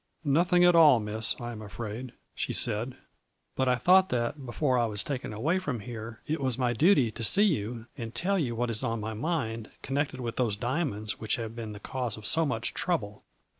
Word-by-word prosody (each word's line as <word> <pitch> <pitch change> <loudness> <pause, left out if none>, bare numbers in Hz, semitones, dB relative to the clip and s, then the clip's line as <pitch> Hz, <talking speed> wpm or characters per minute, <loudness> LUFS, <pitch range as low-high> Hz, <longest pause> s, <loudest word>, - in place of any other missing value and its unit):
" - - -48
'Nothing 175 +5 +3
at 175 - +6
all, 150 -7 +7
Miss, 105 +1 +2
I 120 0 -5
am 110 -2 -8
afraid, 115 +3 -7 0.2
'she - - -3
said, 105 +3 +2
1 - - -22 0.6
but 130 -1 +1
I 125 - +4
thought 185 +9 +5
that 125 +3 -2
before 130 +1 +1
I 120 - +2
was 105 -2 -1
taken 130 -6 -4
away 150 - 0
from 140 - -3
here 110 -1 -8
it 155 0 -2
was 130 -3 0
my 125 -2 +1
duty 140 - +4
to 115 - -5
see 195 - +6
you 115 - -1
and 115 -5 -6
tell 195 +2 +1
you 125 -7 -1
what 120 +1 -1
is 115 +2 -1
on 115 -2 -1
my 110 +1 -4
mind, 115 -4 -3
connected 135 -1 -2
with 120 -2 -4
those 115 -5 0
diamonds 120 -4 -2
which 110 -1 -1
have 115 -1 -6
been 110 -2 -6
the 105 - -9
cause 125 0 -3
of 110 - -10
so 160 +6 +2
much 115 -3 -1
trouble. 105 - -2
120 Hz, 220 wpm, -28 LUFS, 110-145 Hz, 0.6 s, all